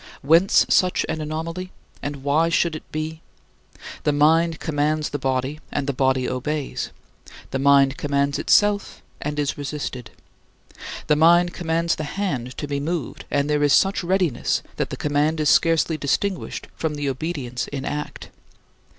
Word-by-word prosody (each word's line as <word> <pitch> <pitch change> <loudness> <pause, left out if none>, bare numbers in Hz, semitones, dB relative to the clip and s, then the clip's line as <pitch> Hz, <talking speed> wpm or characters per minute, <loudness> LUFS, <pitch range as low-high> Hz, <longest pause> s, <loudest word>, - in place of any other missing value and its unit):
Whence 165 +7 +5
such 185 -1 +3
an 155 - -3
anomaly? 165 +4 -4 0.3
And 145 -2 -5
why 155 +4 +2
should 170 -1 +1
it - - -10
be? 155 +1 -4 0.8
The 150 - +2
mind 160 +3 +3
commands 150 0 0
the 145 - -4
body, 130 +2 -1
and 140 - -1
the 140 - -1
body 130 -1 +1
obeys. 140 +3 -3 0.6
The 135 - -1
mind 135 -1 +4
commands 140 -1 0
itself 205 -1 +2 0.2
and 150 0 -3
is 145 -1 -1
resisted. 140 -5 -5 1.0
The 150 - +3
mind 175 +3 +5
commands 165 -1 0
the 155 - -3
hand 130 -11 -2
to 145 - -4
be 140 0 -2
moved 160 +1 -4
and 140 0 +1
there 150 0 +1
is 145 -1 +4
such 195 -1 +3
readiness 180 -7 0
that - - -1
the - - -5
command 150 +2 +1
is 150 -2 +2
scarcely 165 -1 +3
distinguished 185 +7 -1
from 160 -2 -2
the 145 -1 -3
obedience 135 -3 -3
in 140 -1 -5
act. 150 0 -5
150 Hz, 155 wpm, -23 LUFS, 140-165 Hz, 1.0 s, Whence